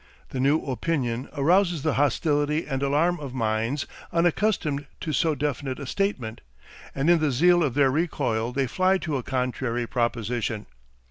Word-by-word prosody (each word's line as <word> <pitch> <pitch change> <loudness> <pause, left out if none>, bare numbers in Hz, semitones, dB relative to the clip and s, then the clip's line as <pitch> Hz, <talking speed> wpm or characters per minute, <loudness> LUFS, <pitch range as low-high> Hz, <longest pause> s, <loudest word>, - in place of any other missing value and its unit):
The 130 - -4
new 140 +4 +3
opinion 130 -3 -2
arouses 170 +1 +3
the 155 - +1
hostility 145 +2 +1
and 135 -2 -3
alarm 150 +6 +2
of 135 -3 -7
minds 115 +4 0 0.3
unaccustomed 170 -4 +1
to 155 - -3
so 155 +2 +2
definite 140 -2 -2
a 140 - -6
statement, 130 - -2 0.5
and 140 +3 0
in 170 -1 +5
the 155 -1 +1
zeal 175 +7 +4
of 140 -6 0
their 140 -2 +4
recoil 130 -7 0
they 135 +1 0
fly 185 +8 +2
to 155 -6 -2
a - - -2
contrary 125 -1 -2
proposition. 115 -2 -2
140 Hz, 155 wpm, -25 LUFS, 125-160 Hz, 0.5 s, in